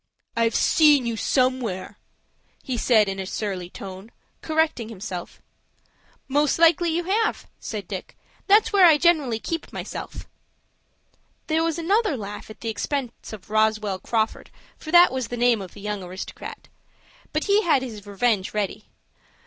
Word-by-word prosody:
"I've 230 -1 +1
seen 295 -5 +5
you 235 -1 -1
somewhere," 250 -6 -1 0.6
he 255 - -3
said, 220 -3 +3
in 195 0 -3
a 190 - -4
surly 190 -4 -4
tone, 190 +3 -9 0.3
correcting 315 -8 0
himself. 185 -4 -7 0.9
"Most 290 +1 +2
likely 335 +1 +4
you 335 +2 0
have," 420 +5 0
said 205 -5 -6
Dick. 190 -3 -7 0.3
"That's 425 +2 +5
where 385 -3 +7
I 315 -3 +6
generally 300 -8 +2
keep 330 +9 -5
myself." - - -7 1.2
There 320 0 +1
was 330 -1 -1
another 385 - +1
laugh 210 -1 -7
at 215 - -12
the 230 - -3
expense 245 +3 -4
of 210 -1 -11
Roswell 215 -3 +1
Crawford, 220 +1 -2 0.3
for 310 - -11
that 350 +2 +7
was 260 -3 -2
the 245 - -5
name 240 -3 +3
of 185 -3 -10
the 205 - -11
young 210 -1 -3
aristocrat. 185 +1 -8 0.6
But 305 - -1
he 410 +1 +3
had 310 -9 +2
his 215 -5 -8
revenge 205 -1 0
ready. 210 0 -2
235 Hz, 150 wpm, -24 LUFS, 210-315 Hz, 1.2 s, where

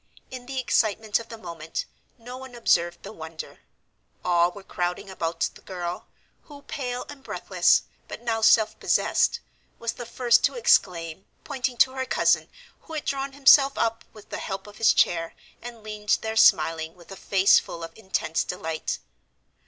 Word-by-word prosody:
In 250 -1 -8
the 265 0 -3
excitement 220 -3 +1
of 230 - -10
the 230 - -8
moment, 170 -5 -6 0.3
no 245 +1 -9
one 260 -1 -10
observed 175 -7 +1
the 200 - -8
wonder; 160 -4 -9 0.7
all 175 -1 +4
were 200 +1 -12
crowding 180 +1 -3
about 165 -2 -4
the - - -16
girl, 175 -1 -5 0.4
who, 285 -2 -13
pale 250 -4 -4
and 290 -2 -11
breathless - - +2 0.2
but - - -8
now 225 -2 -1
self 220 0 +4
possessed, - - +2 0.4
was 230 0 -3
the 240 -2 -8
first 240 -1 +3
to - - 0
exclaim, 185 - +1 0.2
pointing 255 -3 -3
to 260 - +5
her 260 0 -3
cousin, - - +2 0.3
who 320 - -12
had 305 - -4
drawn 275 0 -2
himself 275 0 +6
up, 225 0 0
with 215 -2 -15
the - - -5
help 195 0 -5
of 205 0 -13
his 225 - +5
chair, 165 -1 +1 0.3
and 235 -2 -9
leaned 210 -1 0
there 220 0 -3
smiling, 160 -5 +4
with 175 +1 -17
a - - -6
face 195 0 +4
full 170 - -8
of 165 0 -8
intense 190 -6 -1
delight. 160 -3 -4
215 Hz, 170 wpm, -25 LUFS, 175-250 Hz, 0.7 s, himself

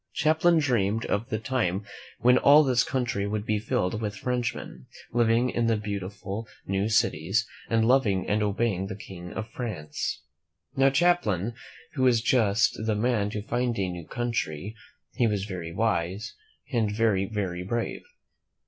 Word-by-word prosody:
Champlain 160 +2 +3
dreamed 115 -7 +1
of 110 +5 -1
the 110 - -1
time 110 -5 -1 0.4
when 125 +1 +5
all 150 +2 +7
this 125 -4 +3
country 120 -7 -1
would 105 0 -2
be 105 -1 +1
filled 105 -1 -1
with 105 -1 -3
Frenchmen, 120 - -3 0.3
living 120 +1 +3
in 120 -1 0
beautiful 100 +1 -5 0.2
new 100 +2 0
cities, 105 -2 +2 0.2
and 115 -1 +3
loving 110 -8 +3
and 105 +1 +1
obeying 105 -2 0
the 95 - -5
King 90 -3 -9
of 110 +1 -5
France. 80 -10 -4 0.5
Now, 135 0 +4
Champlain 130 - +2 0.4
was 130 -4 +4
just 115 -2 +2
the 110 -1 0
man 105 -2 +1
to 105 -1 -4
find 120 +1 -1
a 95 -2 0
new 85 -3 -7
country. 110 -6 -3 0.4
He 120 - +2
was 100 -3 -1
very 90 -5 -6
wise, 95 0 -1 0.4
and 110 -4 +1
very, 105 -3 +2
very 95 -4 -3
brave. 115 +6 -3
110 Hz, 150 wpm, -27 LUFS, 100-120 Hz, 0.5 s, all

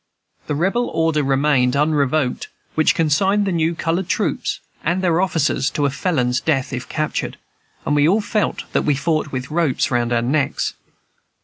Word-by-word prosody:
The 150 - -1
Rebel 195 +10 +1
order 160 -2 +1
remained 135 -2 +2
unrevoked 145 -2 +1 0.3
which 155 - +3
consigned 190 +6 +2
the 195 - 0
new 165 -1 0
colored 170 +3 -1
troops - - -1 0.2
and 180 +3 0
their 175 -1 +2
officers 155 -7 +1
to 145 - -1
a 140 - +1
felon's 130 -5 0
death, 135 -4 0
if 125 -1 -5
captured; 155 0 -2 0.5
and 145 - +1
we 145 +1 +4
all 200 +6 +3
felt 210 0 -1
that - - +2
we 145 - +1
fought 155 +1 -1
with 130 +2 -5
ropes 160 -6 +1
round 120 -1 0
our 120 -1 +1
necks. 140 +3 0
155 Hz, 170 wpm, -20 LUFS, 135-170 Hz, 0.5 s, we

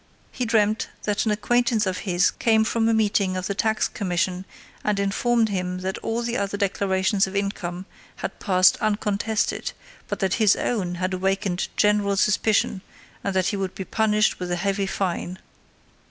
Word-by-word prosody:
He 250 - -3
dreamt 215 -1 +2 0.2
that 210 +1 0
an - - +3
acquaintance 235 +1 +1
of 185 -1 -2
his 180 +1 +3
came 220 -1 +2
from 225 0 +1
a - - +4
meeting 200 -3 +1
of 185 - -3
the 200 - -1
tax 220 +1 +1
commission 185 -1 -2 0.4
and 210 -1 0
informed 225 +3 +1
him 180 -2 -3
that 190 +1 -3
all 230 +1 -2
the 235 +1 -1
other 200 0 -2
declarations 195 0 +1
of 190 - -8
income 190 -2 -3 0.3
had - - -6
passed 185 -2 +4
uncontested, 210 +1 -1 0.3
but - - -3
that 190 -2 0
his 210 -2 +5
own 185 -7 -1
had 185 +1 -2
awakened 190 0 -1
general 205 -1 +2
suspicion, 210 -1 +2 0.4
and 200 -1 -2
that 185 -1 +2
he 210 - -2
would 190 -1 -3
be 190 - -5
punished 215 0 +1
with 180 -1 -4
a - - +1
heavy 195 +2 -1
fine. 185 -1 -2
200 Hz, 170 wpm, -24 LUFS, 185-215 Hz, 0.4 s, his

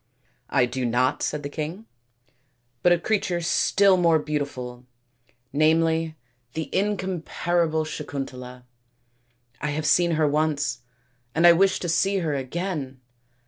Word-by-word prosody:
" 120 - -43
I 125 - +3
do 125 +1 -4
not," 125 +2 +1
said 150 -1 -2
the - - -3
king, 160 +8 -5 0.5
" 125 -2 -45
but 175 - +4
a 175 - +5
creature 180 -1 0
still 190 +3 +3
more 170 -2 +4
beautiful, 140 -5 -4 0.7
namely 160 +1 +2 0.4
the 160 0 -5
incomparable 175 -4 0
Sakuntala. 130 -4 -6 1.0
I 150 - -1
have 150 +1 -2
seen 170 +2 +3
her 155 -1 +2
once, 150 -3 0 0.6
and 165 +2 +3
I 175 - +10
wish 190 +2 +3
to 175 - -2
see 195 +4 +2
her 165 -5 -1
again. 140 -1 -4
155 Hz, 135 wpm, -24 LUFS, 135-175 Hz, 1.0 s, I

